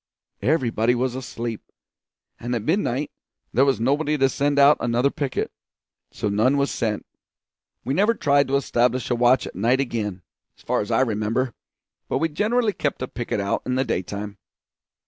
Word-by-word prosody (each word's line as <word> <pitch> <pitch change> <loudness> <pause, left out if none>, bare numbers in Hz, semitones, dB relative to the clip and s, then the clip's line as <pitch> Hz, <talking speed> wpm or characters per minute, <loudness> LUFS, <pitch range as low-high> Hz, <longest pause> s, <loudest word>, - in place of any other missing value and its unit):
Everybody 125 -5 +2
was 125 0 0
asleep; 120 -3 -5 0.8
at 120 - -6
midnight 150 - 0 0.4
there 130 +3 +4
was 135 -3 +2
nobody 145 +5 +1
to 135 -1 +3
send 145 +2 0
out 140 +1 +7
another 120 +3 +1
picket, 140 -3 -2 0.6
so - - -3
none 110 +7 +2
was 140 0 +1
sent. 110 -2 -2 0.8
We 135 - -1
never 210 +8 +3
tried 140 -6 +3
to 135 - 0
establish 125 -2 +1
a - - +3
watch 120 +2 +3
at - - -8
night 115 +7 +2
again, 105 -8 -3 0.3
as - - -21
far - - 0
as 105 - -5
I - - +3
remember, 115 +1 0 0.6
but - - +1
we 165 - 0
generally 215 +7 +1
kept 145 -6 -2
a - - -3
picket 120 -4 -3
out 100 0 -1
in 125 - -2
the 130 +1 +1
daytime. 100 +2 -4
130 Hz, 165 wpm, -23 LUFS, 115-140 Hz, 0.8 s, out